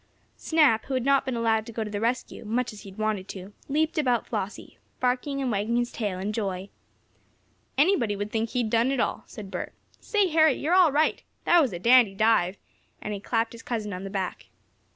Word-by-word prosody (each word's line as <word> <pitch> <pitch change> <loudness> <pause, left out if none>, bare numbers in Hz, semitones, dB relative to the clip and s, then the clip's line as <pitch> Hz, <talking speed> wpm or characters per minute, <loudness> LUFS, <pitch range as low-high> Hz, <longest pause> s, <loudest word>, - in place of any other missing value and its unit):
Snap, 300 -9 +3
who 270 - -3
had 255 -1 -1
not 275 0 +3
been 260 -2 -2
allowed 225 -1 +1
to - - -7
go 225 0 -3
to 215 - -6
the 205 0 -3
rescue, 240 +1 -2
much 230 +2 -1
as 210 - -11
he 200 - -10
had 190 - -15
wanted 215 -3 -1
to, 190 +1 -9 0.2
leaped 310 +2 +1
about 250 -5 +1
Flossie, 210 -2 -5 0.2
barking 255 +3 0
and 260 -3 -1
wagging 210 +3 0
his 240 0 0
tail 205 -5 -3
in 200 +3 -3
joy. 195 -3 -3 1.1
"Anybody 270 - +3
would 205 +1 -4
think 225 0 -1
he'd 240 -3 -1
done 235 +2 +3
it 270 -2 0
all," - - 0
said 205 -4 -9
Bert. - - -5 0.3
"Say, 415 -4 +1
Harry, 315 -2 +5
you're 315 +5 -1
all 365 -4 +6
right! 300 +3 +1 0.2
That 345 -1 +6
was 265 -7 +1
a 175 - -4
dandy 230 0 +5
dive!" 200 -3 +2 0.4
and 210 - -5
he 200 - -4
clapped 225 +2 -1
his 235 - -10
cousin 215 -4 -4
on 180 +1 -6
the 195 - -5
back. 190 -2 -4
230 Hz, 215 wpm, -26 LUFS, 205-265 Hz, 1.1 s, all